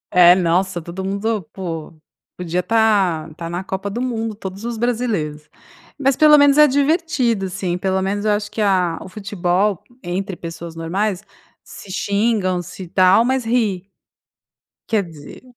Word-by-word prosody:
É, 180 0 +8
nossa, 180 +1 +1
todo 175 +3 -7
mundo, 200 +3 -1
po, 165 -4 -6 0.4
podia 180 0 -2
estar 200 -7 +2
estar 165 +2 -7
na 175 +2 -4
Copa 190 +1 -4
do 225 +4 -4
Mundo, 225 -4 -2
todos 195 0 -8
os 235 -1 -4
brasileiros, 215 -11 -2 0.5
mas 275 -1 +2
pelo 300 +1 +7
menos 285 0 +5
é 300 - +8
divertido, 280 - +1
sim, 180 -1 -2
pelo 190 0 0
menos 200 +2 -2
eu 215 - +3
acho 205 0 -1
que 220 - -3
a 185 -4 +1
o 190 - -9
futebol, 195 -1 -1 0.2
entre 190 +2 -3
pessoas 170 0 -8
normais, 190 +4 -2 0.4
se 195 - -11
xingam, 200 -2 0
se 180 +1 -9
tal, 185 +5 +4
mas 260 0 0
ri. 215 -5 0 1.0
Quer 220 -3 +1
dizer 160 0 -12
195 Hz, 155 wpm, -20 LUFS, 180-225 Hz, 1.0 s, É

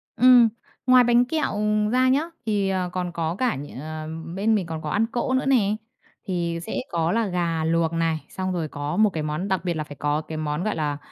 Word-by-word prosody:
Ừm, 245 0 +7 0.4
ngoài 255 -1 +7
bánh 240 +1 +4
kẹo, 310 +4 -1
ừm, 210 0 +1
ra 255 +2 +3
nhá, 275 +3 +3 0.2
thì, 205 -3 +1
à, 185 -2 -1
còn 180 -1 -3
có 165 0 -2
cả 250 - 0
nh 140 -1 -8
ờm, 155 +2 -6
bên 220 +3 +2
mình 195 -4 0
còn 160 -1 -5
có 155 - -4
ăn 215 +7 +2
cỗ 245 +2 -1
nữa 260 +1 +1
nè, 215 -7 +3 0.5
thì 170 -3 -1
sẽ 220 - -4
có 165 0 +1
là 230 +1 +1
gà 170 -3 -1
luộc 165 0 +1
này, 165 -1 -1
xong 185 0 -3
rồi 165 -3 -2
có 145 +1 -4
một 215 -1 +5
cái 160 -4 -4
món 155 +5 -2
đặc 190 -2 -1
biệt 175 - +1
là 155 - -3
phải 145 -1 -10
có 145 +2 0
cái 155 0 -7
món, 150 +1 -2
gọi 215 - -1
là, 150 -2 -1
180 Hz, 235 wpm, -24 LUFS, 160-215 Hz, 0.5 s, Ừm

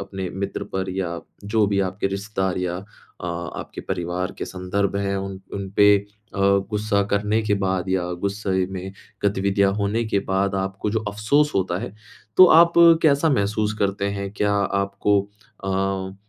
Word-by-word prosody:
अपने 95 -1 -5
मित्र 100 +1 -4
पर 95 0 -2
या 90 -3 -3 0.2
जो 105 0 +2
भी 100 -1 0
आपके 95 +1 -1
रिश्तेदार 95 -1 -2
या 90 -1 -2 0.4
अ, 90 - -5
आपके 85 -1 -5
परिवार 90 +1 -3
के - - -2
संदर्भ 95 +2 -2
हैं 100 0 -1
उन 95 0 -5
उनपे 100 +1 +4 0.4
अ, - - -5 0.3
गुस्सा 105 -1 +1
करने 105 +2 +1
के 105 -1 +1
बाद 95 0 -1
या 90 -2 0 0.2
गुस्से 95 -2 -1
में 95 0 -6 0.3
गतिविधियाँ 100 0 +2
होने 105 +3 0
के 100 -2 0
बाद 95 +1 +1
आपको 95 +2 -2
जो 110 - 0
अफ़सोस 140 +9 +1
होता 90 -2 0
है, 120 - -6 0.4
तो 185 - +10 0.2
आप 170 0 +5 0.3
कैसा 155 +1 +4
महसूस 105 -2 +1
करते 100 0 0
हैं? 100 0 -4
क्या 105 0 0
आपको 100 0 +1 0.4
अ, 95 0 -1
100 Hz, 160 wpm, -23 LUFS, 95-105 Hz, 0.4 s, तो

